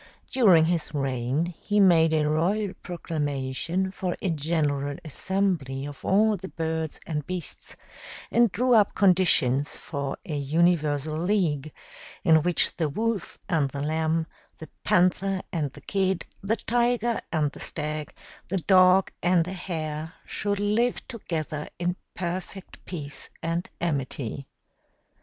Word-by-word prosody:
During 190 Hz, -11 st, +6 dB
his 165 Hz, -2 st, -1 dB
reign 135 Hz, +4 st, -1 dB
he 210 Hz, 0 st, +1 dB
made 165 Hz, -5 st, +6 dB
a 155 Hz, -1 st, +2 dB
royal 185 Hz, +6 st, +1 dB
proclamation 160 Hz, +2 st, -2 dB
for 185 Hz, -2 st, -3 dB
a 185 Hz, -, -1 dB
general 145 Hz, -3 st, 0 dB
assembly 155 Hz, -5 st, -1 dB
of 145 Hz, -1 st, -9 dB
all 215 Hz, +2 st, +4 dB
the 190 Hz, +1 st, -7 dB
birds 160 Hz, -2 st, -3 dB
and 150 Hz, -3 st, -3 dB
beasts, 180 Hz, -2 st, -5 dB, 0.6 s
and 235 Hz, -3 st, +4 dB
drew 250 Hz, +5 st, +2 dB
up 210 Hz, -3 st, +4 dB
conditions 170 Hz, -8 st, +3 dB
for 140 Hz, -2 st, -4 dB
a 155 Hz, -, -3 dB
universal 155 Hz, 0 st, +1 dB
league, 165 Hz, -6 st, 0 dB, 0.5 s
in 160 Hz, -1 st, +6 dB
which 175 Hz, +2 st, +2 dB
the 160 Hz, -4 st, +1 dB
Wolf 220 Hz, +4 st, -2 dB
and 160 Hz, -7 st, +1 dB
the 140 Hz, +1 st, -4 dB
Lamb, 160 Hz, +1 st, 0 dB, 0.3 s
the 160 Hz, -, -10 dB
Panther 185 Hz, +2 st, +2 dB
and 150 Hz, -5 st, -1 dB
the -, -, -12 dB
Kid, 190 Hz, -3 st, 0 dB, 0.2 s
the 205 Hz, +3 st, +1 dB
Tiger 240 Hz, 0 st, +1 dB
and 155 Hz, -4 st, +1 dB
the -, -, -12 dB
Stag, 155 Hz, -1 st, -4 dB, 0.4 s
the 190 Hz, -, 0 dB
Dog 185 Hz, +1 st, +5 dB
and 175 Hz, -2 st, +3 dB
the 185 Hz, -, -5 dB
Hare, 160 Hz, -3 st, -4 dB
should 205 Hz, -1 st, -1 dB
live 215 Hz, +4 st, +1 dB
together 155 Hz, -, -4 dB
in 175 Hz, 0 st, -1 dB, 0.2 s
perfect 185 Hz, +2 st, -5 dB
peace 150 Hz, -5 st, -4 dB
and 165 Hz, +2 st, -2 dB
amity. 140 Hz, -4 st, -2 dB
165 Hz, 135 wpm, -26 LUFS, 150-190 Hz, 0.6 s, During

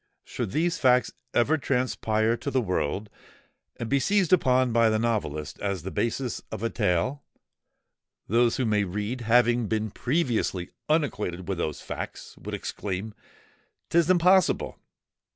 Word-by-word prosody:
Should -, -, -4 dB
these 170 Hz, -, 0 dB
facts 125 Hz, -1 st, +4 dB, 0.2 s
ever 150 Hz, +6 st, +2 dB
transpire 115 Hz, -4 st, +1 dB
to 140 Hz, -, -4 dB
the 135 Hz, -, +1 dB
world, 95 Hz, -, -1 dB, 0.7 s
and 120 Hz, -, -5 dB
be 140 Hz, +3 st, +2 dB
seized 195 Hz, +2 st, +2 dB
upon 130 Hz, -7 st, +3 dB
by 115 Hz, -1 st, +4 dB
the 110 Hz, -, +2 dB
novelist 105 Hz, -10 st, -2 dB
as 100 Hz, -5 st, -2 dB
the 95 Hz, -, -5 dB
basis 120 Hz, +1 st, -2 dB
of 105 Hz, -, -5 dB
a 115 Hz, -, 0 dB
tale, 110 Hz, +7 st, 0 dB, 1.0 s
those 115 Hz, +2 st, +3 dB
who 130 Hz, -, 0 dB
may 105 Hz, -2 st, +2 dB
read, 105 Hz, +6 st, -3 dB
having 120 Hz, 0 st, +3 dB
been 110 Hz, -1 st, -1 dB
previously 120 Hz, -, -1 dB, 0.2 s
unacquainted 105 Hz, -, 0 dB
with 95 Hz, -3 st, -2 dB
those 75 Hz, -3 st, -2 dB
facts, -, -, -7 dB
would -, -, -5 dB
exclaim, 100 Hz, +2 st, -4 dB, 0.8 s
'_'Tis 170 Hz, 0 st, +3 dB
impossible! 185 Hz, +1 st, +3 dB
115 Hz, 140 wpm, -26 LUFS, 105-135 Hz, 1.0 s, facts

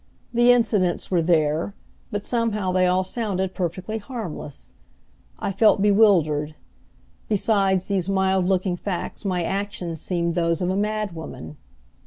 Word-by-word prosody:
The 240 Hz, +1 st, +5 dB
incidents 210 Hz, -9 st, +1 dB
were 175 Hz, -2 st, +3 dB
there, 160 Hz, +2 st, +1 dB, 0.3 s
but 205 Hz, 0 st, -4 dB
somehow 215 Hz, -5 st, 0 dB
they 185 Hz, 0 st, +3 dB
all 185 Hz, +1 st, +2 dB
sounded 190 Hz, -2 st, -2 dB
perfectly 185 Hz, +5 st, -3 dB
harmless. 210 Hz, -, -7 dB, 0.6 s
I -, -, -2 dB
felt 210 Hz, +2 st, +4 dB
bewildered. 180 Hz, -8 st, +3 dB, 0.7 s
Beside 195 Hz, -3 st, +2 dB
these 190 Hz, -1 st, -2 dB
mild 190 Hz, -1 st, +2 dB
looking 185 Hz, -1 st, +1 dB
facts 185 Hz, +2 st, -4 dB
my 180 Hz, -3 st, 0 dB
actions 190 Hz, -4 st, -3 dB
seemed 170 Hz, -2 st, -1 dB
those 170 Hz, -1 st, +1 dB
of 180 Hz, 0 st, 0 dB
a -, -, -1 dB
madwoman. 200 Hz, -, -3 dB
190 Hz, 130 wpm, -23 LUFS, 175-205 Hz, 0.7 s, The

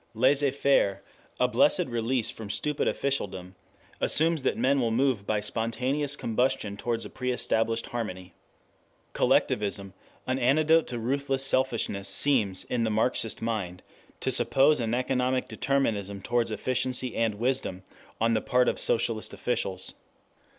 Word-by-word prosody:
Laissez 135 Hz, +4 st, +3 dB
faire, 135 Hz, -7 st, +1 dB, 0.4 s
a -, -, +4 dB
blessed -, -, +3 dB
release 120 Hz, 0 st, -1 dB
from 110 Hz, -2 st, -9 dB
stupid 150 Hz, +7 st, -1 dB
officialdom, 95 Hz, -10 st, -2 dB, 0.5 s
assumes 160 Hz, 0 st, +2 dB
that 130 Hz, -, 0 dB
men 135 Hz, +1 st, +2 dB
will 115 Hz, -, +1 dB
move 115 Hz, -3 st, +1 dB
by 110 Hz, -1 st, +1 dB
spontaneous 125 Hz, +7 st, -1 dB
combustion 115 Hz, -4 st, -1 dB
towards 115 Hz, +2 st, -3 dB
a -, -, -7 dB
pre 125 Hz, 0 st, -2 dB
established 115 Hz, -1 st, 0 dB
harmony. 95 Hz, -6 st, -5 dB, 0.8 s
Collectivism, 100 Hz, -2 st, +1 dB, 0.3 s
an 130 Hz, +1 st, -1 dB
antidote 155 Hz, +6 st, +3 dB
to 120 Hz, -, -4 dB
ruthless 135 Hz, +3 st, 0 dB
selfishness, 120 Hz, -7 st, +1 dB
seems, 110 Hz, -10 st, +1 dB
in 120 Hz, -2 st, -1 dB
the 110 Hz, -, +1 dB
Marxian 110 Hz, +1 st, 0 dB
mind, 95 Hz, -6 st, -3 dB, 0.4 s
to -, -, -1 dB
suppose 145 Hz, +2 st, +3 dB
an 115 Hz, 0 st, 0 dB
economic 130 Hz, 0 st, 0 dB
determinism 105 Hz, -8 st, -1 dB
towards 120 Hz, +4 st, 0 dB
efficiency 125 Hz, +2 st, -2 dB
and 115 Hz, -2 st, 0 dB
wisdom 120 Hz, -5 st, -1 dB, 0.4 s
on 115 Hz, +1 st, +2 dB
the 110 Hz, -, +1 dB
part 125 Hz, 0 st, +2 dB
of -, -, 0 dB
socialist 115 Hz, -1 st, 0 dB
officials. 95 Hz, -6 st, -2 dB
120 Hz, 135 wpm, -27 LUFS, 110-135 Hz, 0.8 s, a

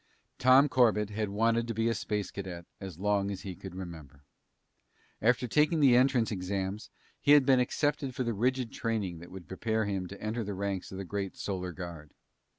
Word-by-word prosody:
Tom 130 Hz, +3 st, +6 dB
Corbett 110 Hz, -6 st, +3 dB
had 105 Hz, 0 st, -2 dB
wanted 115 Hz, +3 st, +1 dB
to 115 Hz, -, -3 dB
be 115 Hz, +1 st, +1 dB
a 115 Hz, -, +2 dB
space 105 Hz, -1 st, -3 dB
Cadet 90 Hz, -3 st, -6 dB
as 95 Hz, -5 st, -8 dB
long 100 Hz, +1 st, +1 dB
as 100 Hz, -2 st, -5 dB
he 95 Hz, -, -6 dB
could 95 Hz, 0 st, -9 dB
remember. 80 Hz, -6 st, -9 dB, 1.0 s
After 125 Hz, +2 st, +2 dB
taking 150 Hz, +6 st, +3 dB
the 135 Hz, -4 st, +6 dB
entrance 125 Hz, -3 st, +3 dB
exams, 95 Hz, +1 st, -3 dB, 0.3 s
he 145 Hz, -, +5 dB
had 145 Hz, -3 st, +6 dB
been 130 Hz, -2 st, +5 dB
accepted 135 Hz, +1 st, 0 dB
for 130 Hz, -, -1 dB
the 120 Hz, -1 st, -1 dB
rigid 125 Hz, +2 st, 0 dB
training 105 Hz, -7 st, -2 dB
that 85 Hz, -, -11 dB
would 95 Hz, -2 st, -10 dB
prepare 110 Hz, +3 st, -1 dB
him 95 Hz, -2 st, -2 dB
to 100 Hz, +2 st, -10 dB
enter 110 Hz, +2 st, -2 dB
the 100 Hz, -1 st, -4 dB
ranks 100 Hz, -1 st, -3 dB
of 95 Hz, -, -7 dB
the 95 Hz, -, -5 dB
great 100 Hz, +1 st, -4 dB
Solar 90 Hz, -2 st, -3 dB
Guard. 85 Hz, -4 st, -9 dB
105 Hz, 195 wpm, -30 LUFS, 95-120 Hz, 1.0 s, Tom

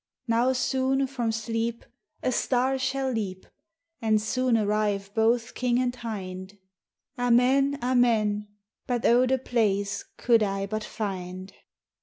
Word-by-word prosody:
Now 235 Hz, +2 st, +3 dB
soone 265 Hz, +1 st, +1 dB
from 250 Hz, -4 st, -2 dB
Sleepe 225 Hz, +1 st, -3 dB, 0.4 s
A 255 Hz, -, +1 dB
Starre 260 Hz, +2 st, +1 dB
shall 265 Hz, 0 st, -1 dB
leap, 195 Hz, -5 st, -4 dB, 0.6 s
And 220 Hz, -1 st, +3 dB
soone 245 Hz, +3 st, +1 dB
arrive 205 Hz, -2 st, 0 dB
both 230 Hz, +2 st, +1 dB
King 245 Hz, -1 st, 0 dB
and 250 Hz, -1 st, 0 dB
Hinde; 195 Hz, -4 st, -6 dB, 0.6 s
Amen, 255 Hz, +3 st, +3 dB
Amen: 225 Hz, -5 st, +2 dB, 0.4 s
But 245 Hz, -2 st, -1 dB
oh, 245 Hz, +2 st, +5 dB
the 265 Hz, +1 st, +2 dB
place 205 Hz, -6 st, 0 dB
co'd 235 Hz, -2 st, +3 dB
I 195 Hz, -1 st, 0 dB
but 215 Hz, +2 st, -3 dB
finde 185 Hz, -3 st, -5 dB
230 Hz, 125 wpm, -26 LUFS, 210-250 Hz, 0.6 s, oh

